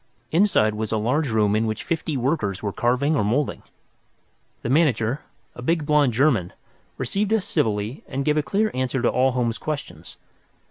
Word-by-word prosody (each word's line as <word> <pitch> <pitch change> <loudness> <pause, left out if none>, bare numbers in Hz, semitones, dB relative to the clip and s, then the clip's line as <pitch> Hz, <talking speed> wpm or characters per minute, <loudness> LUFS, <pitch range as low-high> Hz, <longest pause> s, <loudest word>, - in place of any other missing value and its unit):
Inside 165 - +3
was 110 0 -4
a 110 - +1
large 130 +7 0
room 105 -2 +2
in 110 +1 +1
which 110 - -3
fifty 160 -3 -2
workers 120 - -1
were 100 -2 -2
carving 125 +6 +1
or 125 - +1
moulding. 125 +8 0 1.0
The - - -2
manager, 135 -3 +2 0.3
a - - -9
big 160 +4 0
blond 150 -3 +3
German, 120 - +2 0.4
received 195 - -1
us 220 -4 +2
civilly 105 +3 -1
and 135 0 -3
gave 150 - +2
a 155 - +3
clear 215 +7 0
answer 130 0 -1
to - - +4
all 130 0 +2
Holmes's 120 -2 -1
questions. 150 -2 -6
130 Hz, 175 wpm, -23 LUFS, 110-150 Hz, 1.0 s, to